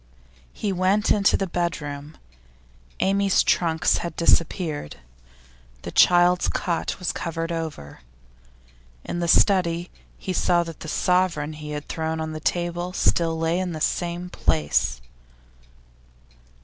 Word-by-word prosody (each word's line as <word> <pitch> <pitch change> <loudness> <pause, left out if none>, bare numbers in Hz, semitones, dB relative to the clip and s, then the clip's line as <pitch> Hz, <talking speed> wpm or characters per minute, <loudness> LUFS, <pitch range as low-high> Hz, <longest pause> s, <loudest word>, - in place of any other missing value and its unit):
He 200 -2 -3
went 190 +3 +2
into 205 -1 +4
the 195 - -1
bedroom. 155 -4 -4 0.8
Amy's 195 0 +3
trunks 165 -2 +2
had 170 -2 -5
disappeared. 165 - +1 0.9
The - - -6
child's 175 0 +5
cot 170 -2 -2
was 180 - -2
covered 165 0 -4
over. 160 - -5 1.0
In 175 - -4
the 170 - -1
study, 175 -2 +3 0.3
he 185 - -4
saw 175 -1 +2
that 165 -2 -9
the - - -8
sovereign 170 -3 +1
he 150 0 -8
had 150 0 -5
thrown 160 0 -3
on 160 0 -3
to - - -6
the 155 - -5
table 175 +2 -2
still 165 -3 +1
lay 165 +2 0
in 185 -2 -2
the 155 - -5
same 175 +2 -2
place. 75 - 0
170 Hz, 130 wpm, -24 LUFS, 160-180 Hz, 1.0 s, child's